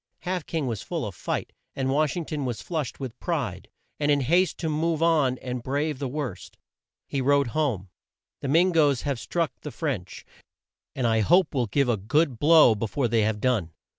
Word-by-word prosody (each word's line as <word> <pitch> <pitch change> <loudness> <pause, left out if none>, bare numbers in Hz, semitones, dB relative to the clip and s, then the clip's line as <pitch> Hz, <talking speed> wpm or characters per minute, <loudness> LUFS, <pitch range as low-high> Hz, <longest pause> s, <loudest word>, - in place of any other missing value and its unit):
Half 180 -2 -3
King 160 -4 -2
was 115 -5 -3
full - - -3
of - - -5
fight, - - -4 0.2
and 135 -1 -1
Wash 150 +3 +1
ing 170 - -3
ton 150 -2 -3
was 125 -4 -3
flushed 155 -7 -3
with 130 -3 -6
pride, 125 - -3 0.3
and 145 -1 +1
in 145 -1 +3
haste 175 +8 +2
to 165 - -3
move 160 +1 0
on 150 -6 +3
and 125 -1 -5
brave 145 +3 -2
the 140 - -2
worst. 130 -8 -5 0.5
He 140 - -2
wrote 140 -1 +3
home: 115 - -1 0.5
"The - - -4
Min 170 +7 +4
goes 145 -6 +3
have 140 -4 -2
struck 170 +3 -1
the 150 - -6
French, 135 - -4 0.7
and 130 - -1
I 110 -1 +3
hope 175 - +3
will 125 -4 0
give 140 +6 +1
a 120 -3 +2
good 130 - +1
blow 155 -6 +7
be 110 +1 -3
fore 130 +4 0
they 115 -1 +2
have 105 0 0
done." 105 -10 0
140 Hz, 200 wpm, -26 LUFS, 120-155 Hz, 0.7 s, blow